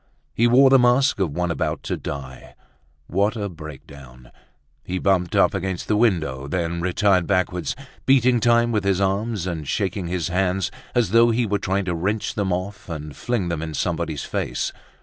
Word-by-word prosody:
He 120 - +3
wore 130 +3 +6
the 135 - +7
mask 125 0 +3
of 95 -4 +1
one 90 +4 -2
about - - -2
to - - -2
die. 65 -2 -8 0.5
What 100 +5 0
a 105 -2 -3
breakdown! 70 -6 -12 0.5
He 90 - -3
bumped 95 0 +1
up 100 - +4
against 95 -2 -3
the 105 - +2
window, 80 - +1
then 85 +2 -2
retired 95 0 +2
backwards, 90 -4 0 0.3
beating 125 -2 +4
time 120 +1 +3
with 105 -3 0
his 95 -1 +1
arms 100 0 -1
and 80 -5 -4
shaking 95 -1 -2
his 90 -1 -2
hands 90 +1 0 0.2
as 120 -6 +2
though 115 +1 +6
he 120 +1 +1
were 100 -1 0
trying 95 0 -1
to 90 - -1
wrench 100 +6 -1
them 100 -3 -1
off 95 +3 -4
and 75 -3 -6
fling 100 - -2
them 85 -2 -2
in 80 -1 -5
somebody's 75 -1 -2
face. - - -2
95 Hz, 180 wpm, -22 LUFS, 85-110 Hz, 0.5 s, the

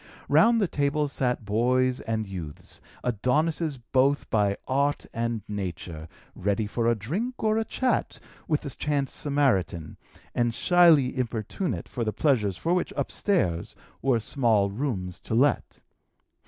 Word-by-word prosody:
Round 230 0 +5
the 200 - +2
tables 145 -1 0
sat 125 -3 -1
boys 125 +4 +2
and 110 -1 -2
youths, 90 -7 -8 0.2
Adonises 145 - 0
both 140 +2 +3
by 100 -2 +2
art 140 +2 +1
and 115 -2 -2
nature, 90 -5 -5 0.3
ready 100 +3 -1
for 115 +2 -1
a 115 - +3
drink 190 - -4
or 215 0 +2
a - - +1
chat 255 +3 -1 0.3
with 150 -2 +1
the 140 - -5
chance 140 0 -1
Samaritan, 120 - 0 0.4
and 120 -1 0
shyly 165 -8 +5
importunate 125 - -3
for 120 - -3
the 110 -1 -2
pleasures 110 - +1
for 170 - 0
which, 180 - 0
upstairs, 90 - 0 0.3
were 130 -4 +2
small 110 -4 +2
rooms 100 -7 -3
to 110 - -4
let. 140 +5 +1
125 Hz, 140 wpm, -26 LUFS, 105-145 Hz, 0.4 s, Round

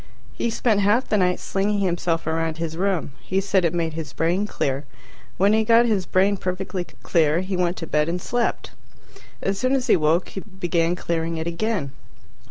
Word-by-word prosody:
He 235 - -1
spent 225 -2 +1
half 210 +6 +2
the 210 - +2
night 180 -2 +2
slinging 205 +2 0
himself 175 -3 0
around 160 0 -1
his 165 -1 -3
room. 185 -4 -1
He 190 - -1
said 195 -1 +1
it 170 - +2
made 165 -2 -1
his 155 -3 -6
brain 175 +5 0
clear. 135 -7 -2 0.5
When 200 +3 +4
he 220 0 +3
got 230 +2 +5
his 205 -6 0
brain 195 +2 +3
perfectly 185 0 -3 0.2
clear, 160 0 +2
he 185 0 -3
went 180 0 0
to 165 - -5
bed 150 0 +1
and 175 +1 -1
slept. 240 +6 -1 0.7
As 195 0 -1
soon 255 +3 +2
as 260 -2 0
he 245 - +5
woke, 160 +2 +2
he - - -6
began 175 -4 -1
clearing 165 -1 -2
it 160 - -3
again. 170 -3 -2
180 Hz, 190 wpm, -23 LUFS, 165-200 Hz, 0.7 s, got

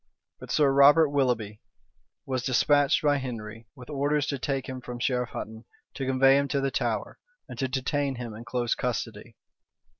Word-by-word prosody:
But - - -11
Sir 145 -2 +3
Robert 145 +3 +6
Willoughby 120 -7 -1 0.6
was 130 -2 -2
despatched 140 +3 +2
by 145 -1 +3
Henry 115 -4 -7
with 125 -3 -12
orders 145 0 0
to 140 -2 -3
take 135 0 -2
him 130 -2 -6
from 125 0 -7
Sherif 125 0 -1
Hutton, 110 +1 -7 0.3
to 135 - -4
convey 135 +1 +5
him 140 - -1
to 140 +1 -1
the 135 0 -1
Tower, - - -2 0.3
and - - -10
to 135 - 0
detain 135 +1 -1
him 120 -2 -6
in 110 +2 -9
close 120 -1 -1
custody. 115 -2 -4
130 Hz, 175 wpm, -27 LUFS, 120-140 Hz, 0.6 s, Robert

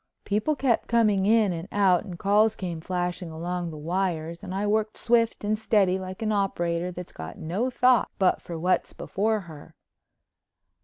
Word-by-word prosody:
People 210 +9 0
kept 260 -4 +1
coming 210 -4 +3
in 215 -3 +4
and 165 +2 -6
out 195 -2 +3
and 180 -4 -7
calls 210 +4 +3
came 175 -4 -5
flashing 180 0 -3
along 175 +2 -4
the 155 - -8
wires 170 0 -2
and 190 - -6
I 195 +2 -1
worked 215 +1 0
swift 230 -2 +1
and 210 +1 0
steady 195 -4 +2
like 185 +3 -6
an 215 - 0
operator 180 -4 0
that's 180 0 -9
got 80 +2 -8
no 195 +11 -2
thought 250 -1 +3
but 190 -3 +2
for 170 - -6
what's 180 +3 0
before 215 +2 -1
her. 160 -5 -13
190 Hz, 170 wpm, -26 LUFS, 175-215 Hz, -, in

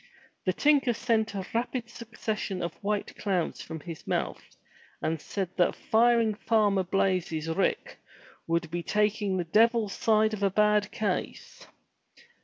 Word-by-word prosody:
The 185 - +2
tinker 285 -2 +3
sent 225 -2 0
a 190 -1 -3
rapid 235 +1 -2
succession 220 -5 -4
of 170 - -3
white 205 0 -2
clouds 185 -5 -1
from 160 -1 -7
his 165 0 -9
mouth - - -3 0.4
and 160 -1 -2
said 195 -3 -3
that 175 - +3
firing 230 -1 +3
Farmer 210 -2 +2
Blaize's 180 -4 0
rick 195 - -1 0.5
would 170 0 -1
be 175 +1 -2
taking 210 0 0
the 180 - 0
devil's 220 +3 +3
side 220 -1 +2
of 210 - -4
a 200 - +3
bad 210 +1 +3
case. 210 - -4
210 Hz, 140 wpm, -28 LUFS, 185-225 Hz, 0.5 s, tinker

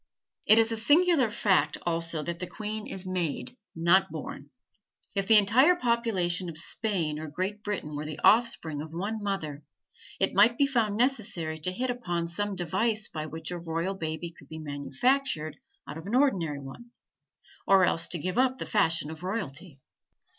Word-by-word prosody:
It 215 - +8
is 225 0 +4
a 225 - -1
singular 290 +2 +4
fact, 210 -3 +2
also, 165 -2 -1
that 170 +1 -4
the 180 - -4
queen 215 +2 -5
is 190 0 -7
made, 185 +4 -3 0.2
not 170 +3 +4
born. - - -7 0.7
If 195 -1 -1
the 220 - +8
entire 245 - +5
population 210 - 0
of 160 - -7
Spain 170 -4 -1
or 160 - -6
Great 185 +7 -4
Britain 190 -8 -4
were 145 - -3
the 155 0 -6
offspring 185 -10 +3
of 155 - -7
one 205 +6 -3
mother, 160 -8 -3 0.6
it - - +1
might 220 +4 +5
be 280 - +4
found 230 -6 0
necessary 210 -11 0
to 180 +4 -1
hit 250 +7 -1
upon 175 -9 -3
some 205 +4 -3
device 210 +5 0
by 155 -1 -5
which 160 +1 -6
a 175 - -4
royal 165 +3 -2
baby 165 -1 -4
could 140 -4 -18
be 160 - -7
manufactured 155 - -1 0.3
out 150 +3 -7
of 165 - -10
an 220 - -1
ordinary 180 - +2
one, 140 - -11 0.8
or 195 -1 +6
else 165 -1 +1
give 180 +5 -2
up 260 0 +2
the - - -5
fashion 165 -7 +2
of 160 0 -9
royalty. 175 -6 -5
185 Hz, 175 wpm, -28 LUFS, 160-220 Hz, 0.8 s, It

